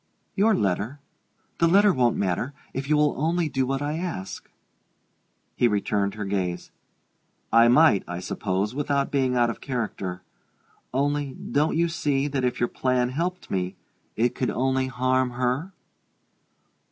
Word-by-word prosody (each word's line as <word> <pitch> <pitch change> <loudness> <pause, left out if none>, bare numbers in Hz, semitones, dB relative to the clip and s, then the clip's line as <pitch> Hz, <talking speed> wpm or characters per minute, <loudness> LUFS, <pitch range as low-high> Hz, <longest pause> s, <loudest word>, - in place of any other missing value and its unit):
"Your 215 +2 +4
letter? 105 - -1 0.6
The 165 - +4
letter 200 +3 +5
won't 125 -3 +2
matter, 100 +9 -1 0.2
if 135 +2 -4
you 150 - +4
will 150 -1 +3
only 165 +1 +1
do 130 -2 0
what 135 +1 -1
I 150 +2 -2
ask." 130 - -5 1.1
He 120 - +3
returned 100 -1 0
her 105 -1 -4
gaze. 90 -3 -2 0.8
"I 115 +1 +7
might, 125 -4 +5
I 90 0 -4
suppose, 95 +3 -2
without 140 0 0
being 130 -3 +1
out 120 -1 +3
of - - -10
character. 100 -8 -4 0.7
Only, 140 +1 -1
don't 150 +2 0
you 170 +1 +3
see 145 -4 0
that 135 -2 -2
if 125 - 0
your 120 - +2
plan 125 -1 0
helped 175 +7 -3
me 95 0 -1 0.4
it 120 +2 +1
could 130 - -1
only 130 +1 0
harm 130 0 +1
her?" 125 +8 -1
130 Hz, 150 wpm, -25 LUFS, 110-145 Hz, 1.1 s, I